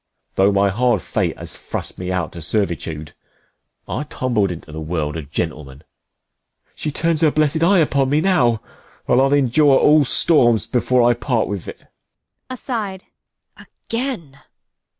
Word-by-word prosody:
Though 95 +1 +3
my 100 0 +2
hard 120 0 +1
fate - - -2
has - - -1
thrust - - -5
me 90 0 -4
out 90 -1 -2
to 85 - -9
servitude, 80 -4 -2 0.8
I - - -3
tumbled 120 -8 -1
into 80 -2 -9
th'world 80 -1 -3
a 80 - -4
gentleman. 75 -2 -5 0.9
She 150 - -4
turns 165 +1 0
her 160 - +5
blessed 155 +1 +1
eye 190 +4 +4
upon 140 -5 +2
me 145 +2 +2
now, 125 - +2 0.4
50 - - 0
And 125 - +5
I'll 135 +1 +2
endure 140 +1 +4
all 150 0 +5
storms 125 -5 +4
before 125 0 +1
I 120 - +4
part 120 -1 -1
with't. 100 -4 -5
Bea. - - -29 0.6
[aside.] 220 -7 -5 0.5
Again! 230 - -6
125 Hz, 150 wpm, -19 LUFS, 90-150 Hz, 0.9 s, her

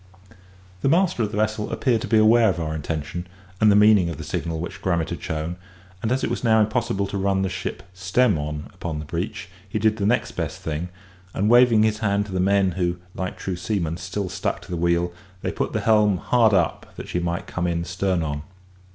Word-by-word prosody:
The - - +2
master 170 -4 +2
of 105 - 0
the 105 - -5
vessel 110 0 -1
appeared 120 -5 +1
to - - -4
be 110 - +3
aware 110 +1 +6
of 90 -2 -1
our 80 -1 -2
intention, 80 +3 -4 0.3
and 110 -1 +6
the - - +5
meaning 105 -4 +5
of 85 - -5
the - - -6
signal 80 -1 -3
which 95 +4 -6
Grummet 85 -4 0
had - - -5
shown; 80 +3 -3 0.4
and 110 - -1
as 130 +1 0
it - - 0
was - - -3
now 110 -2 +4
impossible 110 -2 +1
to 100 0 -4
run 95 0 +1
the 95 - 0
ship - - -5
stem 95 +4 +2
on 75 0 -5
upon 80 -3 -5
the 75 - -5
beach, 95 +6 -4 0.2
he 100 - -2
did 110 +1 +2
the 100 -2 0
next 120 +3 +1
best - - -4
thing; 80 +3 -3 0.5
and 105 +3 +2
waving 120 -3 +6
his 110 -1 +1
hand 100 -2 +1
to 100 - -10
the 95 - -1
men 95 0 +3
who, 90 0 -1 0.2
like 95 0 -4
true 95 - -3
seamen, 90 -3 -2
still 95 +2 -4
stuck - - -2
to - - -12
the - - -1
wheel, 85 +1 +1 0.3
they - - -1
put - - -2
the - - -1
helm 105 -3 +4
hard 110 +2 +3
up, 85 -4 -1
that - - -8
she 90 - -1
might 85 0 -2
come 90 0 -2
in 85 -1 -1
stern 90 -1 0
on. 75 -1 -3
95 Hz, 230 wpm, -23 LUFS, 85-110 Hz, 0.5 s, aware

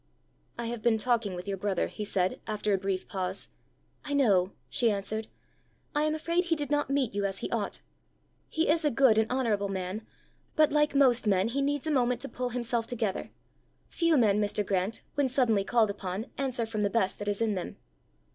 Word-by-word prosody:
"I 235 - -3
have 235 -1 -4
been 235 -1 +3
talking 225 -4 0
with 180 +2 -7
your 195 -1 -2
brother," 195 -1 0
he 210 - -6
said, 185 -3 0
after 210 -1 0
a - - +3
brief 190 -1 -2
pause. 185 -2 -3 0.5
"I 290 - -4
know," 200 -9 +3 0.2
she 235 - +2
answered. 215 +2 -2 0.7
"I 300 0 +2
am 310 0 +1
afraid 340 +3 0
he 335 -1 +1
did 295 -2 -4
not 290 -2 +1
meet 275 -5 +1
you 200 0 -1
as 195 -1 -1
he - - -4
ought. 220 -4 -2 0.7
He 320 +1 0
is 320 +2 +3
a 300 - +3
good 235 -4 +4
and 220 +1 +1
honourable 220 -6 +1
man; 190 +2 -3 0.5
but 310 -1 +4
like 300 -1 +2
most 250 -5 +4
men 195 +1 +3
he 275 +4 -1
needs 285 +1 0
a 315 - 0
moment 250 -3 +2
to 275 - -4
pull 250 0 -3
himself 235 -1 -1
together. 220 -5 -2 0.6
Few 335 -3 +2
men, 210 -4 +4
Mr. 205 0 0
Grant, 195 +3 -1
when 285 -2 +1
suddenly 240 -6 +2
called 220 -1 +2
upon, 195 +1 -4
answer 255 -4 -1
from 220 -1 -3
the 205 - +2
best 195 -3 0
that 205 - -5
is 205 -1 0
in 225 -2 +1
them." 185 -3 -5
225 Hz, 205 wpm, -29 LUFS, 200-270 Hz, 0.7 s, good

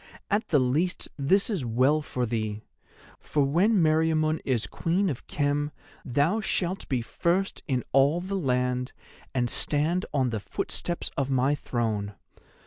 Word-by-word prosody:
At 205 +2 +1
the 150 - +3
least 145 +8 0
this 185 +8 +2
is 195 - -2
well 130 +6 +2
for 125 -4 -2
thee, 110 -2 -3 0.6
for 145 - 0
when 175 +11 +3
Meriamun 155 -1 +2
is 125 -5 0
Queen 180 +2 0
of 130 - -8
Khem 145 0 0 0.3
thou 145 - +1
shalt 190 -2 -2
be 125 -3 0
first 180 +10 -1
in 130 -4 0
all 140 +5 +4
the 185 +3 -5
land, 125 -3 0 0.4
and 120 -2 +2
stand 155 +9 +1
on 130 -4 +1
the 110 - -2
footsteps 170 - -3
of 135 -1 0
my 135 +1 +2
throne. 110 -7 -2
145 Hz, 145 wpm, -27 LUFS, 125-170 Hz, 0.6 s, all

